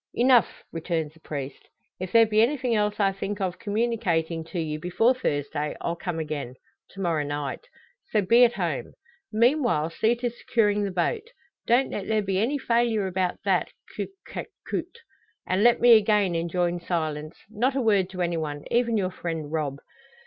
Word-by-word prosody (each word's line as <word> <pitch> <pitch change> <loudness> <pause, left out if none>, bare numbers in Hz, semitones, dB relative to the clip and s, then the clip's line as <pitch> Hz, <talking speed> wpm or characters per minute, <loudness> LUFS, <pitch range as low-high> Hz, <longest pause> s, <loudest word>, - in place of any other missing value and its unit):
"Enough!" 245 -1 +3
returns 165 -2 -2
the 160 - -21
priest. 140 -4 -7 0.3
"If 185 0 -5
there 230 -1 +7
be 215 0 +3
anything 255 0 +1
else 210 -1 0
I 195 -1 +3
think 195 +1 -4
of 185 -2 -2
communicating 200 -7 -1
to 175 +2 -5
you 155 -2 -3
before 180 +9 +2
Thursday 150 - -2
I'll 170 - -2
come 175 -1 -4
again 150 -5 -4 0.4
to - - -10
morrow 165 -5 +1
night. 145 - -4 0.4
So 210 -2 +2
be 235 +6 +6
at 240 -1 +5
home. 175 - -3 0.4
Meanwhile, 235 - +2
see 225 +7 +2
to 240 0 -2
securing 210 -3 +1
the - - -2
boat. 420 - -1 0.4
Don't 245 +3 +3
let 195 - -4
there 220 -1 +1
be 190 -1 0
any 250 +8 +1
failure 230 -5 +1
about 185 -1 -2
that, - - +1 0.2
coute 390 - -5
que - - -6 0.2
coute. 470 - -4 0.4
And 185 +3 +1
let 240 0 +5
me 240 0 +6
again 210 -3 +3
enjoin 175 +1 0
silence 155 -3 -3
not 245 +5 0
a - - +1
word 200 -5 +2
to 185 -1 -3
any 170 -1 -1
one, 145 -2 -4
even 235 -1 +2
your 185 -2 0
friend 165 -4 -5
Rob. 150 -4 -2
190 Hz, 180 wpm, -26 LUFS, 165-230 Hz, 0.4 s, there